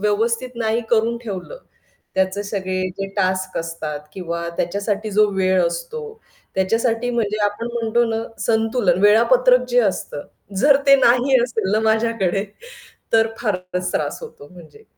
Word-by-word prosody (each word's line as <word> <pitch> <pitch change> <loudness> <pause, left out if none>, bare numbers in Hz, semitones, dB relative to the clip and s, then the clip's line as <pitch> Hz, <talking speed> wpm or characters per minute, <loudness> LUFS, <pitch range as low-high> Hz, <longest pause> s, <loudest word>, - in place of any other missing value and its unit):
व्यवस्थित 230 +4 0
नाही 225 0 0
करून 230 +1 +2
ठेवलं. 215 - -6 0.6
त्याचे 190 +2 0
सगळे 190 -2 -3 0.2
जे 195 - -2
टास्क 185 -1 0
असतात 165 -3 -5
किंवा 170 -2 -4
त्याच्यासाठी 205 +4 -2
जो 210 +1 +4
वेळ 185 -1 +3
असतो. 170 - -5 0.5
त्याच्यासाठी 225 +5 0
म्हणजे 215 -3 -1
आपण 205 +3 -2
म्हणतो 235 0 +1
ना 225 0 -2 0.2
संतुलन 220 -5 +1
वेळापत्रक 250 +4 +5
जे 245 0 +2
असतं 190 -8 -2 0.3
जर 285 -1 +6
ते 275 - +8
नाही 255 +2 +4
असेल 220 -5 -2
ना 215 - +3
माझ्याकडे 220 -4 +1 0.7
तर 225 0 +4
फारच 180 -4 -2
त्रास - - -2
होतो 295 - -11
म्हणजे. 180 - -15
215 Hz, 135 wpm, -20 LUFS, 185-235 Hz, 0.7 s, ते